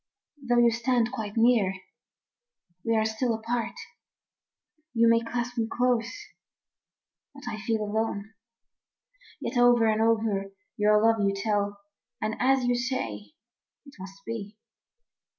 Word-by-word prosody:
Though 245 Hz, -2 st, +1 dB
you 240 Hz, -1 st, +5 dB
stand 235 Hz, 0 st, +1 dB
quite 220 Hz, -4 st, -5 dB
near, 225 Hz, -5 st, +3 dB, 1.1 s
we 230 Hz, 0 st, +1 dB
are 220 Hz, 0 st, +2 dB
still 225 Hz, +2 st, 0 dB
apart, 230 Hz, +1 st, -3 dB, 1.2 s
You 230 Hz, 0 st, +5 dB
may 230 Hz, 0 st, +5 dB
clasp 240 Hz, +1 st, -4 dB
me 225 Hz, -, 0 dB
close, 245 Hz, -2 st, +1 dB, 1.2 s
but 280 Hz, -, -12 dB
I 215 Hz, -1 st, -4 dB
feel 220 Hz, -1 st, -1 dB
alone. 215 Hz, 0 st, -2 dB, 1.1 s
Yet 245 Hz, -, -1 dB
over 245 Hz, -1 st, +5 dB
and 220 Hz, 0 st, +2 dB
over 215 Hz, -3 st, +1 dB, 0.2 s
your 210 Hz, -1 st, +4 dB
love 225 Hz, 0 st, +4 dB
you 200 Hz, 0 st, +1 dB
tell, 205 Hz, -1 st, -1 dB, 0.4 s
And 215 Hz, 0 st, -2 dB
as 265 Hz, +1 st, +3 dB
you 245 Hz, -, +2 dB
say, 175 Hz, -, -3 dB, 0.5 s
it 280 Hz, -, -14 dB
must 195 Hz, +1 st, -11 dB
be. 215 Hz, -2 st, -6 dB
225 Hz, 130 wpm, -27 LUFS, 210-240 Hz, 1.2 s, you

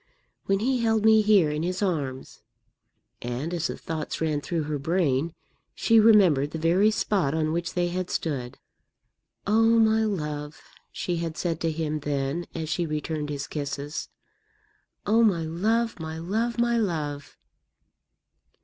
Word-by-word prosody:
When 195 Hz, 0 st, +1 dB
he 255 Hz, +2 st, +1 dB
held 225 Hz, -2 st, +1 dB
me 220 Hz, 0 st, +6 dB
here 205 Hz, -7 st, +4 dB
in 150 Hz, +1 st, -2 dB
his 180 Hz, +4 st, -2 dB
arms" 145 Hz, -9 st, -3 dB, 0.8 s
and, 125 Hz, +8 st, -4 dB
as 170 Hz, -1 st, -1 dB
the -, -, -5 dB
thoughts 160 Hz, -2 st, -5 dB
ran 155 Hz, -2 st, 0 dB
through 165 Hz, 0 st, -2 dB
her 150 Hz, -1 st, -3 dB
brain, 160 Hz, 0 st, 0 dB, 0.4 s
she 225 Hz, 0 st, +4 dB
remembered 190 Hz, -11 st, +5 dB
the 160 Hz, -, -5 dB
very 175 Hz, +6 st, +3 dB
spot 190 Hz, -8 st, 0 dB
on 155 Hz, -1 st, 0 dB
which 170 Hz, +1 st, -3 dB
they 175 Hz, -1 st, +1 dB
had 180 Hz, +1 st, -3 dB
stood 130 Hz, -6 st, -3 dB, 0.9 s
"oh, 225 Hz, +2 st, +4 dB
my 220 Hz, 0 st, +4 dB
love!" 150 Hz, -7 st, -3 dB, 0.3 s
she 175 Hz, -1 st, -3 dB
had 165 Hz, -1 st, -4 dB
said 165 Hz, -3 st, -2 dB
to 165 Hz, -, +1 dB
him 155 Hz, -1 st, -2 dB
then 145 Hz, +3 st, -2 dB
as 160 Hz, -1 st, -3 dB
she 170 Hz, +2 st, -1 dB
returned 150 Hz, 0 st, -3 dB
his 145 Hz, -1 st, -3 dB
kisses 145 Hz, +1 st, -5 dB, 1.0 s
"oh, 225 Hz, +3 st, +4 dB
my 185 Hz, -7 st, +3 dB
love, 220 Hz, +8 st, 0 dB
my 160 Hz, 0 st, -5 dB
love, 220 Hz, +8 st, -2 dB
my 235 Hz, 0 st, +2 dB
love!" 150 Hz, -8 st, -3 dB
165 Hz, 150 wpm, -26 LUFS, 150-205 Hz, 1.0 s, me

